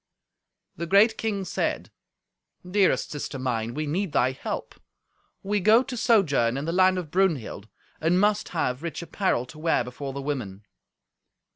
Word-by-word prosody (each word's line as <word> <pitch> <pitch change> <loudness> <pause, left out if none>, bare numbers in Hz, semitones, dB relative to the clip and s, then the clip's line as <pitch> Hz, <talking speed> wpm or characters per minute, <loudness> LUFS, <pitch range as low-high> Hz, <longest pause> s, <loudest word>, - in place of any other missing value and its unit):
The 170 +2 -4
great 205 +5 +5
king 205 -4 -2
said, - - -2 0.8
"Dearest 195 +1 +2
sister 145 -2 -5
mine, 120 -3 -2
we 155 - -2
need 170 +2 -2
thy 125 +1 +3
help. 130 - -5 0.7
We 205 +1 0
go 220 +6 +5
to 265 -1 -6
sojourn 145 - +2
in 140 - -3
the 165 - -1
land 185 +1 +4
of 170 -5 -5
Brunhild, 160 - 0 0.3
and 170 +3 +2
must 210 +1 +2
have 130 -6 -1
rich 170 0 -5
apparel 170 - 0
to 130 +5 -13
wear 160 -5 +1
before 130 +3 -6
the 140 - -6
women." 110 -9 -4
165 Hz, 155 wpm, -26 LUFS, 130-195 Hz, 0.8 s, great